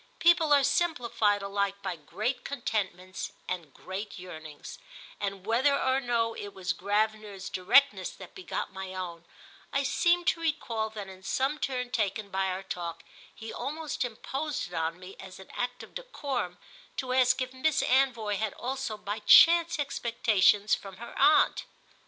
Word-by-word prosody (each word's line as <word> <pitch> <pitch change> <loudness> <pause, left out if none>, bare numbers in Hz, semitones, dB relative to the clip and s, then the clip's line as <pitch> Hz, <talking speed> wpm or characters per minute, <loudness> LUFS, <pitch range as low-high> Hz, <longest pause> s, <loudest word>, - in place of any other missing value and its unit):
People 335 -2 +4
are 285 -1 +6
simplified 245 -9 +1
alike 200 0 -1
by 190 -2 -2
great 215 - -3
contentments 195 -8 -3
and 170 -5 -4
great 190 +8 -7
yearnings, 160 -5 -9 0.4
and, 195 -2 -4
whether 260 +6 +3
or 260 0 +2
no 235 -3 0
it 205 -2 -8
was 190 -1 -1
Gravener's 210 0 -1
directness 265 - +4
that - - -12
begot 365 - -4
my 190 0 -6
own, 170 -2 -6 0.5
I 275 - +1
seem 345 +5 +2
to 330 - +1
recall 235 -9 -1
that 210 -2 -7
in 190 -1 -11
some 270 +10 0
turn 250 -3 -2
taken 205 -1 -1
by 190 0 0
our 185 +1 -3
talk 170 -3 -5 0.3
he 225 0 -9
almost 305 0 -3
imposed 265 - -4
it - - -14
on 165 +1 -2
me 185 +1 -10
as 190 -1 -10
an 190 - -13
act 245 0 -3
of - - -14
decorum 275 - -4 0.4
to 255 -1 -2
ask 255 +1 +4
if 255 0 -3
Miss 275 +3 +1
Anvoy 240 -6 +2
had 215 -1 -2
also 260 -3 -3
by 210 +1 -4
chance 335 +7 +7
expectations 220 -7 +2
from 195 -2 -2
her 235 +1 -9
aunt. 295 +3 +5
220 Hz, 160 wpm, -29 LUFS, 190-270 Hz, 0.5 s, chance